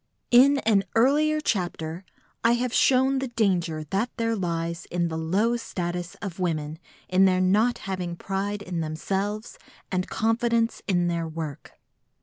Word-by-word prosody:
In 270 +4 +7
an 205 -3 +4
earlier 300 +6 +3
chapter 175 - -2 0.4
I 230 +1 +5
have 245 0 -1
shown 265 +1 +4
the 265 - -2
danger 180 -9 0
that 210 +6 0
there 230 -1 0
lies 170 -3 -3
in 175 -1 -1
the 160 - -4
low 205 +9 +1
status 175 -5 -4
of 190 -3 -5
women 160 -3 -2 0.3
in 185 +1 +4
their 185 -1 +3
not 210 +6 +3
having 185 -3 -3
pride 200 +3 -3
in 180 -3 -4
themselves 195 +7 -3 0.3
and 185 -1 -1
confidence 230 +1 +1
in 175 -3 +2
their 170 -1 -1
work. 155 -2 -7
190 Hz, 145 wpm, -25 LUFS, 170-230 Hz, 0.4 s, In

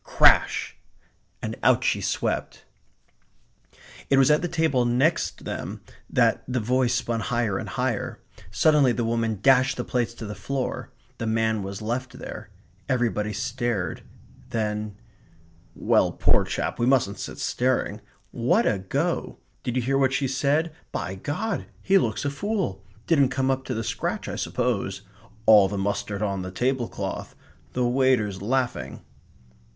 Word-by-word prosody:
Crash! - - +4 0.7
And - - -3
out - - +4
she - - +1
swept. - - -2 1.4
It 135 - +4
was 135 +2 +6
at 150 - +4
the 175 - -1
table 160 -7 +2
next 130 +8 +1
them - - -5 0.3
that - - +2
the 125 0 0
voice 125 +2 +1
spun 115 -2 -1
higher 110 -4 0
and - - -6
higher. - - -2 0.3
Suddenly 150 -5 +4
the 120 - -1
woman 115 -1 0
dashed 130 -1 +4
the 125 - -2
plates 120 -2 -1
to 115 - -7
the 105 - -5
floor. 125 +6 -3 0.3
The 115 - -2
man 110 -1 +1
was 100 +2 -6
left 125 +4 -3
there. - - -8 0.4
Everybody 115 -5 0
stared. 115 -5 -2 0.5
Then 105 -2 -2 0.8
"Well, - - +3
poor - - +3
chap, - - -3
we 120 - +2
mustn't 125 -7 +2
sit - - -6
staring. 120 -4 0 0.3
What 120 0 +2
a 100 - +2
go! 95 0 -2 0.2
Did 125 - -3
you 125 - +1
hear 135 +3 +1
what 135 -1 +3
she 135 0 +1
said? 145 +5 +1 0.2
By 85 +4 -3
God, 170 - -3 0.2
he 195 0 +5
looks 115 - -1
a 140 - 0
fool! 185 - -2 0.2
Didn't 140 -6 +4
come 130 0 +1
up 130 0 -2
to 125 - -3
the 115 - -2
scratch, 110 0 -3
I - - -4
suppose. 100 -6 -1 0.4
All 105 -3 +8
the 100 +1 -4
mustard 100 +1 -2
on 100 -2 -1
the 95 - -5
tablecloth. 120 +5 -2 0.4
The 125 -1 +1
waiters 120 -6 +2
laughing." 125 +4 -1
120 Hz, 150 wpm, -25 LUFS, 105-135 Hz, 1.4 s, All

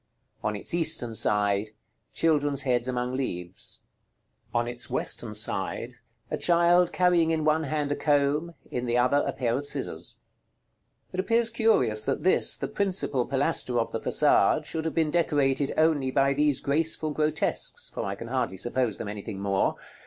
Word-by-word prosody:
On 105 - -1
its 100 - -3
eastern 155 -8 +1
side. 105 -1 +1 0.4
Children's 145 -4 +1
heads 125 -2 +1
among 125 0 -2
leaves. 90 -9 -5 0.7
On 120 0 0
its 120 0 -6
western - - -1
side. - - -3 0.4
A - - -1
child 175 0 +3
carrying 175 -3 +3
in 160 -1 0
one 155 +1 +2
hand 145 0 -2
a - - +1
comb; 150 +3 +1 0.2
in 125 0 -3
the 120 +1 +1
other, 125 +3 +3
a - - 0
pair 120 -3 -1
of 145 - -4
scissors. - - -3 1.0
It 185 - -4
appears 230 +4 +2
curious, 175 - +2
that 135 - -2
this, 185 - +3
the - - -3
principal 185 -10 -1
pilaster 135 -2 +1
of 115 - -2
the 115 - -3
façade, 150 +3 +3
should 160 +1 -4
have 160 - -3
been 160 -2 +1
decorated 145 -5 +1
only 155 -4 +2
by 135 +1 +2
these 145 -1 +1
graceful 155 +1 0
grotesques, 150 0 0
for - - -5
I 100 - -3
can 115 - -8
hardly 125 -7 -2
suppose 120 +2 -1
them 110 - -6
anything 100 0 -6
more. 100 -1 0
140 Hz, 165 wpm, -26 LUFS, 120-160 Hz, 1.0 s, child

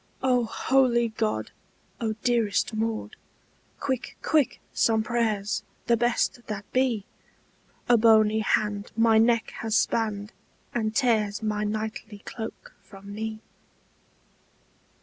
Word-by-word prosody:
"O 250 -2 +3
holy 240 -1 +2
God! 220 0 -2 0.5
O 220 -2 -1
dearest 230 -3 +1
Maud, 220 0 -2 0.6
Quick, 260 -3 -3
quick, 305 -5 +2
some 220 -1 +2
prayers, 220 -3 0 0.2
the 235 - +4
best 240 +1 0
that 205 -2 -5
be! 250 -6 +1 0.8
A 240 - +6
bony 220 -1 +5
hand 210 -1 0
my 225 -1 +5
neck 230 0 +2
has 225 0 0
spanned, 210 -3 0 0.4
And 220 -2 -1
tears 220 -5 +1
my 210 -1 -1
knightly 215 -1 -4
cloak 225 -1 -7
from 200 0 -12
me!" 220 +1 -5
220 Hz, 110 wpm, -26 LUFS, 215-235 Hz, 0.8 s, A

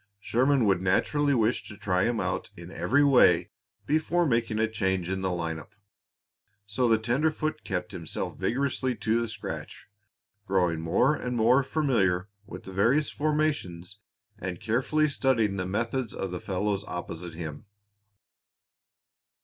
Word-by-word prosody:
Sherman 130 +4 +2
would 95 -3 +2
naturally 140 +10 +2
wish 115 0 +2
to 105 - -10
try 90 -1 +1
him 115 -2 0
out - - -2
in 85 +1 -10
every 145 +9 +2
way 125 -11 +5 0.3
before 160 +3 +1
making 115 -5 0
a 110 0 +2
change 95 -5 -1
in 95 0 -2
the 95 - 0
line 85 -2 -2
up. 80 - -15 0.9
So 120 +5 0
the 115 -1 +4
tenderfoot 155 +7 -1
kept 90 -3 -3
himself 85 -5 -5
vigorously 130 0 0
to 115 +1 0
the 115 - -2
scratch, 110 -4 -7 0.6
growing 90 -4 +1
more 125 - +3
and 125 -3 -3
more 120 +4 +5
familiar 110 - +1 0.2
with - - -9
the 95 - -9
various 130 +10 +2
formations 145 - -1 0.4
and 90 -1 -5
carefully 130 +8 +1
studying 120 -8 +1
the 90 -1 -2
methods 115 +4 -2
of 95 - -4
the 90 - -5
fellows 100 +1 -1
opposite 85 -1 -6
him. 80 +2 -7
110 Hz, 145 wpm, -27 LUFS, 90-130 Hz, 0.9 s, way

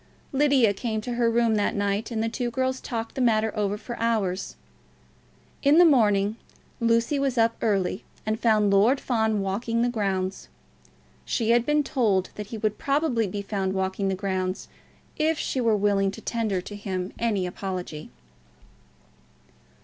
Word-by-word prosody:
Lydia 270 -6 +3
came 220 +2 -3
into 220 +3 -3
her 235 -1 +2
room 230 -1 +2
that 205 -1 +1
night, 205 +1 -1
and 225 -2 -2
the - - 0
two 240 +2 -2
girls 260 +1 -1
talked 230 -2 -4
the 265 - -3
matter 220 -2 +2
over 205 -1 -1
for 235 +3 -7
hours. 210 -5 -1 1.1
In 285 +2 +5
the 350 - +8
morning 215 -7 +3 0.4
Lucy 230 +4 +2
was 270 -2 0
up 230 0 +3
early, 195 -3 0 0.2
and 215 +1 -1
found 215 -3 +3
Lord 220 +8 +4
Fawn 220 -4 0
walking 200 +4 -2
in 230 - +3
the 245 - +2
grounds. 195 -4 -2 0.7
She 230 -1 0
had 235 0 +3
been 295 0 +3
told 215 -10 +1
that 210 -1 -7
he 225 - -6
would 215 -1 -2
probably 275 -6 +1
be 200 +2 -4
found 195 -2 -2
walking 190 +1 -1
in - - +1
the 190 - 0
grounds, 185 -1 -3 0.5
if 315 +1 +1
she 265 - -2
were 225 -3 +3
willing 200 -1 +2
to 195 - -8
tender 220 -5 -1
to 205 - -9
him 190 -2 -4
any 210 -5 0
apology. 180 -4 -5
220 Hz, 170 wpm, -25 LUFS, 195-235 Hz, 1.1 s, the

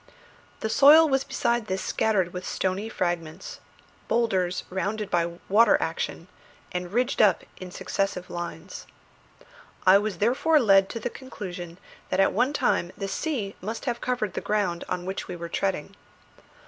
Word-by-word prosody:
The - - -1
soil 310 +3 +8
was 270 -2 +1
besides 240 -4 -1
this 190 -1 -2
scattered 190 -5 +1
with 180 0 -5
stony 190 +4 -2
fragments, 175 -6 -3 0.5
boulders 185 -6 +1
rounded 205 +2 -2
by 170 0 0
water 225 +4 +5
action, - - -3 0.4
and 180 0 -4
ridged 245 +3 +1
up 200 -5 +4
in 185 - -8
successive 185 0 -3
lines. 175 +1 -7 1.0
I 190 +1 +7
was 205 -3 -3
therefore 260 - +3
led 195 -5 +5
to 230 - -5
the 240 - -3
conclusion 180 -9 -8 0.3
that 185 - 0
at 195 - +4
one 245 +6 +2
time 175 -10 0
the 195 - -3
sea 210 -2 -3
must 220 +7 -5
have 240 -3 -2
covered 240 -7 -1
the - - -3
ground 200 -5 -1
on 180 0 -3
which 190 +1 -4
we 180 - -5
were 170 0 -7
treading. 190 -3 -2
195 Hz, 155 wpm, -26 LUFS, 180-230 Hz, 1.0 s, soil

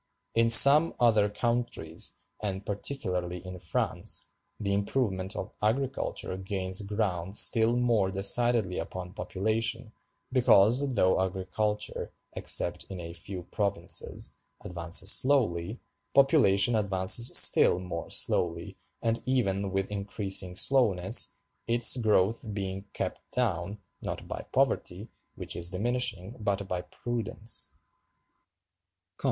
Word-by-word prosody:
In 115 0 +2
some 140 +7 +8
other 110 -4 +2
countries, 115 -7 -3 0.3
and 100 -2 -5
particularly 90 -5 -4
in 90 0 -9
France, - - -3 0.3
the 100 -2 -2
improvement 100 -2 -2
of - - -6
agriculture 125 -3 -3
gains 95 0 -3
ground 100 -3 -4
still 115 +1 +4
more 115 -6 0
decidedly 100 0 +1
upon 90 0 -8
population, 110 +3 -3 0.4
because 125 +2 +2
though 95 -2 +2
agriculture, 105 +3 -4 0.2
except - - 0
in 95 - -7
a 85 -1 -8
few 90 +2 -8
provinces, 100 -3 -1 0.2
advances 90 +2 +3
slowly, 110 -7 +1 0.4
population 120 -7 +4
advances 100 +3 +4
still - - +6
more 90 -2 -7
slowly, 85 -1 -1 0.2
and 115 0 -1
even 100 -7 -1
with 95 +1 -3
increasing 100 -2 -1
slowness, 100 -5 +3 0.3
its 120 +1 +4
growth 110 -1 0
being 95 -1 -5
kept - - -5
down, 100 -5 -3 0.2
not - - -7
by - - -8
poverty, - - -2 0.3
which - - -4
is 85 0 -3
diminishing, 115 0 -2
but 100 -2 -3
by 90 -1 -4
prudence. 115 +2 -3
100 Hz, 110 wpm, -27 LUFS, 95-115 Hz, 0.4 s, some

